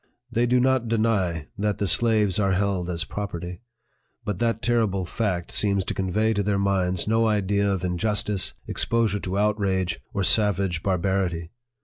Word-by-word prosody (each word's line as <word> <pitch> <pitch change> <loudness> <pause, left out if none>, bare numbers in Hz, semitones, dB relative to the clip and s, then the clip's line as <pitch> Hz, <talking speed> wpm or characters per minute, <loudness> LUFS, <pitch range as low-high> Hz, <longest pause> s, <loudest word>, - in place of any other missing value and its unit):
They 120 +1 +1
do 125 +1 +3
not 130 -1 +2
deny 105 -8 0
that 105 0 0
the 100 - -1
slaves 110 -3 +3
are 100 -2 +2
held 95 -2 0
as 85 -1 -1
property; 90 -2 -6 0.6
but 105 -3 -3
that 115 -1 0
terrible 110 -6 +1
fact 90 -3 -2
seems 100 -2 +1
to - - -2
convey 105 +4 0
to 100 - 0
their 100 0 0
minds 95 -2 +1
no 115 +1 +3
idea 100 -1 +1
of 95 -2 -2
injustice, 100 +2 -1
exposure 115 -3 0
to 95 0 -3
outrage, 100 -5 0
or 100 - -1
savage 95 -4 +2
bar 95 0 +1
barity. 85 -3 -1
100 Hz, 160 wpm, -24 LUFS, 90-110 Hz, 0.6 s, do